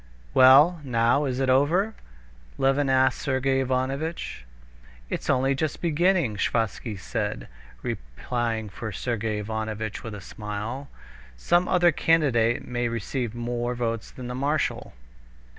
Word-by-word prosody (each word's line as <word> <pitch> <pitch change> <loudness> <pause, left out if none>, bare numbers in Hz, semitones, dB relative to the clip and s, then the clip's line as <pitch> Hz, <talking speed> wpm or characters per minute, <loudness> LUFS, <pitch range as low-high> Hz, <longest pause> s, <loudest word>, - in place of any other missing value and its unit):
"Well, 145 +6 +7
now 120 +2 +2
is 130 -2 -2
it 135 - +1
over?" 160 +11 +3 0.6
Levin 135 +1 +2
asked 130 0 +3
Sergey 135 0 +1
Ivanovitch. 135 - -2 0.7
"It's - - -3
only 135 +2 +3
just 150 +2 -2
beginning," 170 - +2
Sviazhsky 110 0 -1
said, 105 - -3 0.4
replying 110 - -3
for 110 +3 -6
Sergey 110 +1 -2
Ivanovitch 110 0 -4
with 110 -2 -6
a - - -7
smile. 105 +8 -6 0.5
"Some 175 - +2
other 175 -1 +4
candidate 135 -8 +2
may 120 -1 -1
receive 115 +1 -3
more 120 +1 -2
votes 115 -2 -2
than 130 - -9
the 125 - -4
marshal." 145 +4 -1
125 Hz, 125 wpm, -26 LUFS, 110-140 Hz, 0.7 s, Well